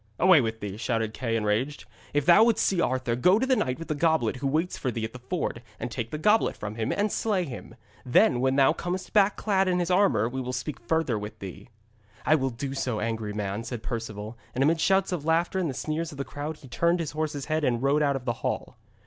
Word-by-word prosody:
'Away 180 -4 +6
with 110 -1 -3
thee,' 100 -1 -5
shouted 115 -1 -1
Kay, 115 -2 -2
enraged. 115 +7 -1 0.3
'If 145 -1 0
thou 175 +6 +7
wouldst 230 -1 +3
see 185 -3 +2
Arthur, 130 -5 0
go 180 - +4
to 250 - +1
the 260 0 +3
knight 130 - -1
with 165 - -8
the 155 - 0
goblet 155 -6 +1
who 135 +2 -2
waits 160 +6 0
for 130 - -2
thee 115 -2 -3
at 110 - -7
the 125 - -9
ford, 125 -2 -3 0.2
and 120 +1 -4
take 115 -1 -4
the 150 - -4
goblet 210 +7 +3
from 105 0 -5
him, 110 0 -2
and 205 0 0
slay 205 -5 0
him. 135 -7 -8 0.3
Then 125 0 +4
when 130 0 +2
thou 140 +2 +5
comest 180 +2 -4
back 205 -1 +4
clad 195 -2 +1
in 180 -1 +2
his 175 0 0
armour, 180 - +3
we 130 +2 -4
will 125 0 -4
speak 130 +3 -4
further 125 -2 0
with 105 +1 -7
thee.' 95 +3 -9 0.6
'I - - +4
will 135 -4 +2
do 135 +3 -5
so, 125 -5 -2
angry 110 -1 -2
man,' 105 +1 -3
said 115 -1 -6
Perceval, 110 -1 -5 0.2
and 130 - +2
amid 160 +4 +3
the - - -4
shouts 195 0 +3
of 175 -5 -2
laughter 165 +4 +1
and 175 -4 0
the 130 - -4
sneers 160 +4 -3
of 145 - -10
the 140 - -3
crowd 150 +2 -5
he 135 - -14
turned 170 +9 +1
his 165 -3 -3
horse's 150 -2 -3
head 155 0 -1
and 120 -2 +1
rode 140 +2 +3
out 140 -2 +2
of 130 -2 -5
the 120 - 0
hall. - - -3
135 Hz, 250 wpm, -27 LUFS, 115-165 Hz, 0.6 s, thou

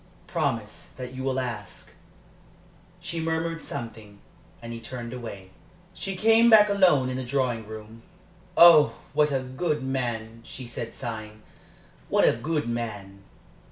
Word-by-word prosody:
"Promise - - -3
that 125 -1 -7
you 130 - -6
will 135 0 0
ask." 115 -6 -6 1.1
She 170 -1 -5
murmured 165 0 -2
something, 110 -3 -7 0.4
and 115 0 -8
he 115 - -6
turned 120 +1 -7
away. 100 -6 -8 0.4
She 195 -1 -4
came 225 +4 +5
back 210 -2 +8
alone 180 -10 +4
into 130 0 -3
the 125 - -8
drawing 125 -5 -1
room. 110 +1 -10 0.6
"Oh, 170 -3 +8 0.2
what 150 -1 +3
a 135 -1 0
good 140 +3 -2
man!" 120 -4 -3
she 125 +2 -9
said, 115 -1 -7
sighing. 110 -3 -7 0.7
"What - - +4
a - - +5
good 155 -4 -2
man!" 105 -5 -5
125 Hz, 140 wpm, -26 LUFS, 115-155 Hz, 1.1 s, back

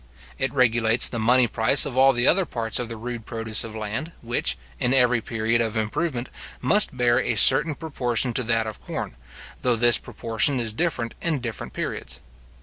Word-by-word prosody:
It 135 - -1
regulates 115 -3 +3
the 115 - -4
money 125 +3 +3
price 115 +4 +4
of 125 - -6
all 135 +1 +5
the 120 -1 -1
other 190 +6 +4
parts 115 -2 -1
of 120 -2 -5
the 115 - -7
rude 120 0 -7
produce 115 -1 -1
of 110 -1 -9
land, 110 +10 -5
which, 120 +1 -2 0.2
in 125 +2 +1
every 125 -2 +2
period 115 +1 -1
of 110 -1 -2
improvement, 120 +4 -3 0.3
must 205 -10 +2
bear 120 0 +2
a 120 -3 -2
certain 150 +8 +5
proportion 125 -6 -1
to 130 - +3
that 115 -1 0
of 110 -1 -8
corn, - - -6 0.5
though 125 -2 +1
this 120 +1 +3
proportion 115 +3 0
is 115 -2 -2
different 130 -6 -3
in 165 -3 0
different 115 -3 -7
periods. 65 - -5
120 Hz, 185 wpm, -23 LUFS, 115-130 Hz, 0.5 s, all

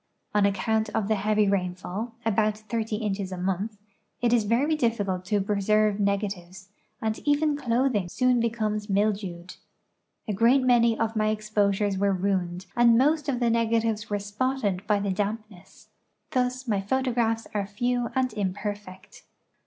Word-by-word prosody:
On 205 -1 +4
account 220 +3 0
of 210 - 0
the 220 - +2
heavy 210 +1 +2
rainfall 190 +4 -2
(a)jout 215 -1 +1
30 220 0 -3
inches 200 -3 -3
a 185 - -4
montli) 190 +4 -2 0.4
it 240 -1 +2
is 230 -3 +3
very 265 +9 +2
dillicult 205 -9 -1
to 205 +2 +1
j)reserve 210 +1 +1
negatives, 195 -2 -2 0.3
and 220 0 -1
even 295 +1 +1
cloth 260 -1 +1
ing 200 -5 0
S(jon 250 +4 +2
becomes 215 -2 -1
mildewed. 195 -3 -1 0.7
A 210 - -1
great 235 +6 +4
many 235 -2 +4
of 225 0 -1
my 215 0 +1
exposures 210 -2 0
were 200 0 +2
ruined 185 -1 -1
ami 240 -1 +5
most 295 +3 +2
of 250 -3 0
the 235 -2 +2
negatives 225 -2 0
were 205 - 0
spotted 205 -1 -2
by 210 -1 +3
the 200 -1 -1
damp 210 +3 -2
ness. 190 -1 -18 0.4
Thus 255 0 -1
my 205 -4 +1
photographs 230 0 0
are 200 -2 -1
few 240 +3 -1
and 260 -1 +1
im])erfect. 205 -1 -5
215 Hz, 155 wpm, -26 LUFS, 200-235 Hz, 0.7 s, ami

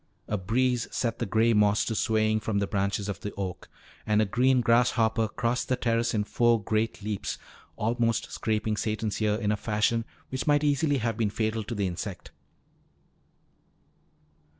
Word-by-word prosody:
A 105 - -1
breeze 120 +5 0
set 115 -2 -2
the - - -2
gray 115 +3 +3
moss 105 -1 +3
to 115 - -2
swaying 110 0 +1
from 110 -1 -2
the 100 - +1
branches 100 0 -1
of 100 - -4
the 105 - -5
oak. 95 -2 -5 0.3
And 105 0 +2
a 110 - +4
green 125 +5 +3
grasshopper 115 -1 +3
crossed 120 +3 -2
the 130 - +3
terrace 115 -1 0
in 105 - +1
four 120 +2 +2
great 110 0 -1
leaps, 105 -2 -3 0.4
almost 115 +1 0
scraping 110 -1 -1
Satan's 110 -1 -2
ear 105 -1 +2
in 105 -1 0
a - - +2
fashion 110 +2 0 0.2
which 130 +3 -4
might 145 0 +4
easily 145 0 +2
have 115 -3 -1
been 110 -3 +1
fatal 110 +1 -1
to 115 - -4
the 100 -1 0
insect. 90 +1 -5
110 Hz, 170 wpm, -27 LUFS, 105-120 Hz, 0.4 s, a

